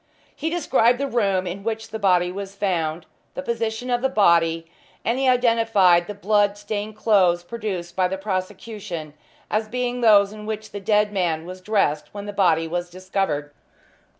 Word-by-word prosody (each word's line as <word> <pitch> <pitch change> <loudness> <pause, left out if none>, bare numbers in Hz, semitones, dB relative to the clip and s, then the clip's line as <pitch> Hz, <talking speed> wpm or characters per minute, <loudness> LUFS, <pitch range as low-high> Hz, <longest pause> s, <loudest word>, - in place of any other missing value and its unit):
He 320 - -2
described 265 -8 +2
the 280 - -1
room 200 -8 +1
in 185 +3 -5
which 225 0 -3
the 220 0 -5
body 180 -3 +3
was 195 +1 -7
found; 170 -5 -1 0.3
the 275 - -4
position 230 0 -2
of 240 0 +1
the 265 - +1
body; 165 -7 +3 0.4
and 235 +3 +1
he 270 - +1
identified 225 -8 +4
the 210 - -6
blood 205 0 +2
stained 205 +1 -4
clothes 190 -5 +3
produced 185 -5 -5
by 185 -1 +2
the 190 +1 -3
prosecution 185 -4 -5 0.4
as 215 +1 0
being 245 +1 -2
those 205 -3 +5
in 210 0 -9
which 215 0 -5
the 205 - -5
dead 210 +1 +2
man 165 -4 -1
was 185 +1 -9
dressed 185 -8 0
when 205 0 -6
the 205 - -6
body 165 -5 +2
was 175 +1 -3
discovered. 180 -5 -3
200 Hz, 175 wpm, -23 LUFS, 180-220 Hz, 0.4 s, those